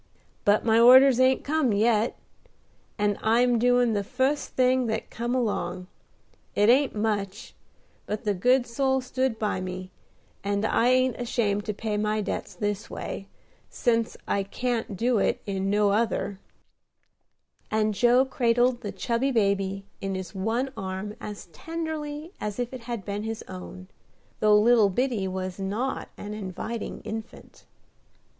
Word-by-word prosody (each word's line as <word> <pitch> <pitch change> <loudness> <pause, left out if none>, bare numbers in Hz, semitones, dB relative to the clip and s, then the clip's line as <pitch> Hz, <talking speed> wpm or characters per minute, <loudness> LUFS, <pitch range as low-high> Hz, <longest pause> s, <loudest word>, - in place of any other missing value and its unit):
But 205 +1 +3
my 225 0 +4
orders 255 +2 +8
ain't 260 0 +4
come 290 -6 +1
yet, 220 +2 +2 0.8
and 205 -1 0
I 225 +2 +3
am 245 -2 +3
doing 245 -1 +3
the 205 -1 0
fust 265 +8 -1
thing 255 -1 +3
that 220 0 -3
come 240 +2 -2
along. 185 -7 -1 0.7
It 205 +2 +4
ain't 265 +1 +4
much, 210 -1 -2 0.5
but 210 +3 -3
the 210 -2 +1
good 245 +7 +3
soul 265 +2 0
stood 255 -2 -1
by 210 -4 -1
me, 185 0 -6 0.5
and 200 +1 0
I 230 - +2
ain't 255 -1 +3
ashamed 210 -4 0
to 210 - -2
pay 215 0 -2
my 215 +1 0
debts 205 - -4
this 205 -2 -3
way, 195 - -6 0.4
sence 230 -2 0
I 200 - +1
can't 225 +1 -3
do 235 +1 +2
it - - +1
in 195 -1 -2
no 205 0 +3
other;" 205 -2 0 1.3
and 215 0 +1
Joe 245 +5 +4
cradled 245 -1 +2
the 205 -4 -4
chubby 240 +3 -1
baby 195 -3 0 0.2
in 195 -1 -2
his 185 0 -6
one 225 +7 -1
arm 190 +2 -5
as 210 -1 -7
tenderly 315 - -5
as 210 -1 -3
if 245 +1 -3
it 250 -3 -8
had 235 -5 -5
been 205 0 -3
his 220 0 -4
own, 90 0 -9 0.5
though 210 -1 +5
little 225 -2 +5
Biddy 230 -1 0
was 185 0 -4
not 210 +7 -2
an 205 +1 -6
inviting 210 +3 -5
infant. 220 +1 -8
220 Hz, 150 wpm, -26 LUFS, 200-245 Hz, 1.3 s, orders